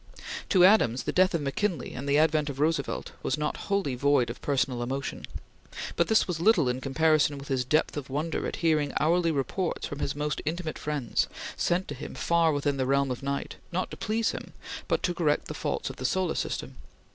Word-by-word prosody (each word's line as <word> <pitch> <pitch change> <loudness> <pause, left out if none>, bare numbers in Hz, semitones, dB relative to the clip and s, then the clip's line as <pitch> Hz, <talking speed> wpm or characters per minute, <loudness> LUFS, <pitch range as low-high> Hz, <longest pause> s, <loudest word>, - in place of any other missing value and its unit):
To 180 -3 +6
Adams 130 - +4
the - - -1
death 185 -1 +3
of 165 - 0
McKinley 165 +3 -1
and 140 +3 -5
the 140 - +4
advent 155 -1 +3
of 140 -1 -6
Roosevelt 160 +3 0
were - - -2
not 150 0 -1
wholly 200 -9 +1
void 125 -2 +2
of - - -11
personal 130 -3 0
emotion, 130 +1 -4 0.7
but 170 - +2
this 220 - +3
was 175 -3 -2
little 170 - +4
in 125 +1 -1
comparison 150 +1 +2
with 140 +1 -9
his 130 -2 +1
depth 150 +5 +1
of 145 -2 -5
wonder 155 +4 -2
at - - -4
hearing 155 -3 +2
hourly 170 +2 +3
reports 160 +5 -1
from 145 - -6
his 140 - -2
most 150 0 -2
intimate 160 +1 -3
friends, 145 -6 -1 0.3
sent 180 +2 0
to - - -4
him - - -8
far 170 -1 +3
within 145 -1 0
the 130 -1 0
realm 140 0 +2
of 125 - -4
night, 140 0 -3
not 180 +2 -2
to - - -5
please 220 +1 0
him, - - -8 0.3
but - - 0
to 175 - +1
correct 155 -4 +1
the - - -5
faults - - -2
of - - -13
the 130 - -5
solar 180 +3 +1
system. - - -3
150 Hz, 210 wpm, -28 LUFS, 140-170 Hz, 0.7 s, To